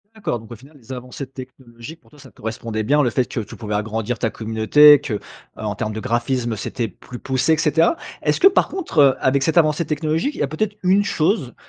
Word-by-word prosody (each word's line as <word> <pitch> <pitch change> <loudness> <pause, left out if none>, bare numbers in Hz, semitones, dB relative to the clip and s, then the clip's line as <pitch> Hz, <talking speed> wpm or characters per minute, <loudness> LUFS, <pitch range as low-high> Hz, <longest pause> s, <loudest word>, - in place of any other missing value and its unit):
D'accord, 205 - -3
donc, 110 +1 -15
au - - -6
final, 140 +7 -18
les 130 0 -10
avancées 125 +2 -7
technologiques, 130 +2 -12
pour - - -27
toi, 150 - -18
ça 130 - -14
correspondait 110 0 -5
bien, 145 +7 +3
le 125 - +2
fait 125 +2 0
que - - -5
tu 105 -2 -7
pouvais 105 -2 -6
agrandir 110 +2 -2
ta 115 - 0
communauté, 115 +8 +5
que, 140 -6 -4
heu, 105 - -2 0.4
en 105 -1 -3
termes 110 +2 -4
de 110 - -5
graphisme, 120 0 -1
c'était 115 +2 -3
plus 120 +6 -11
poussé 130 +5 0
et - - +1
cetera. 165 - +2 0.3
Est-ce - - 0
que 385 - +7
par 390 - +3
contre, 360 - -3
heu, 135 -2 +6
avec 135 +1 +2
cette 160 +4 0
avancée 155 0 +3
technologique, 155 - -1
il - - -9
y - - +1
a - - 0
peut-être 200 +8 -3
une 190 +3 +4
chose, 155 - 0
130 Hz, 235 wpm, -20 LUFS, 115-155 Hz, 0.4 s, que